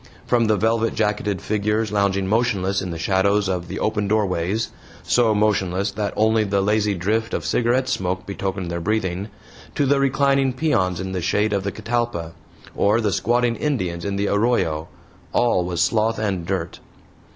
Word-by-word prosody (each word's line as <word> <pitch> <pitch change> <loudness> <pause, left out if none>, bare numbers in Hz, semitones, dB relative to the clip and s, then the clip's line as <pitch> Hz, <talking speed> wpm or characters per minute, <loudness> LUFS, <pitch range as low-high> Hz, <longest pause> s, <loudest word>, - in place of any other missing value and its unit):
From 120 -2 +2
the 110 -1 +2
velvet 115 +2 +1
jacketed 105 -3 -1
figures 105 +1 0
lounging 100 -2 +1
motionless 100 -3 +1
in 95 - -4
the 85 - -4
shadows 100 +4 +2
of 90 -2 -2
the 95 - -5
open 105 -1 0
doorways 100 0 0 0.3
so 115 -3 +3
motionless 100 -2 +1
that 105 0 -2
only 110 0 +3
the 100 -1 0
lazy 105 0 +1
drift 110 +6 -1
of 85 - -4
cigarette 120 +8 +1
smoke 90 -3 -2
betokened 95 -2 -4
their 85 - -2
breathing 100 0 -1 0.5
to 145 - +2
the 140 +1 +3
reclining 135 -1 +2
peons 100 - 0
in 95 0 -4
the 95 -1 -2
shade 105 +5 +1
of 100 -1 -1
a - - 0
catalpa, 110 -7 -2 0.4
or 105 +3 +3
the 105 -4 0
squatting 120 0 +1
Indians 95 - -2
in 100 -1 -2
the 100 +1 0
arroyo 100 -8 +1 0.5
all 120 -7 +2
was 85 -1 0
sloth 110 +4 +1
and 95 -5 -2
dirt. - - -3
105 Hz, 170 wpm, -22 LUFS, 95-115 Hz, 0.5 s, so